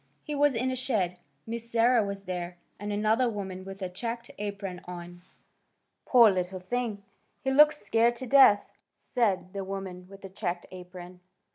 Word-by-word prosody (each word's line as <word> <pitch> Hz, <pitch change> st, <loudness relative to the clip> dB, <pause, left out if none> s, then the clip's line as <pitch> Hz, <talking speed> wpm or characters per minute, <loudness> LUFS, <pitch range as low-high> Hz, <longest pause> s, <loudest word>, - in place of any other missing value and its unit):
He 300 Hz, -, -5 dB
was 290 Hz, -2 st, +3 dB
in 255 Hz, +3 st, 0 dB
a -, -, -2 dB
shed. 200 Hz, -9 st, -1 dB, 0.3 s
Miss 230 Hz, +1 st, -5 dB
Sarah 235 Hz, 0 st, +4 dB
was 200 Hz, -1 st, -5 dB
there, 180 Hz, -1 st, -5 dB, 0.2 s
and 205 Hz, +1 st, -4 dB
another 215 Hz, +4 st, +2 dB
woman 190 Hz, -4 st, -5 dB
with 195 Hz, 0 st, -8 dB
a -, -, -1 dB
checked 230 Hz, +6 st, -5 dB
apron 200 Hz, -3 st, -5 dB
on. 175 Hz, 0 st, -9 dB, 0.9 s
"Poor 235 Hz, -4 st, +7 dB
little 185 Hz, 0 st, -2 dB
thing! 210 Hz, +2 st, -3 dB, 0.4 s
He 265 Hz, -, +1 dB
looks 300 Hz, +2 st, +6 dB
scared 230 Hz, +3 st, +3 dB
to 260 Hz, -, -5 dB
death," 250 Hz, -5 st, +6 dB, 0.2 s
said 195 Hz, -6 st, -1 dB
the 200 Hz, -1 st, -3 dB
woman 190 Hz, -2 st, -6 dB
with 195 Hz, 0 st, -13 dB
the 195 Hz, -, -8 dB
checked 180 Hz, -2 st, -4 dB
apron. 180 Hz, 0 st, -10 dB
200 Hz, 165 wpm, -28 LUFS, 185-235 Hz, 0.9 s, Poor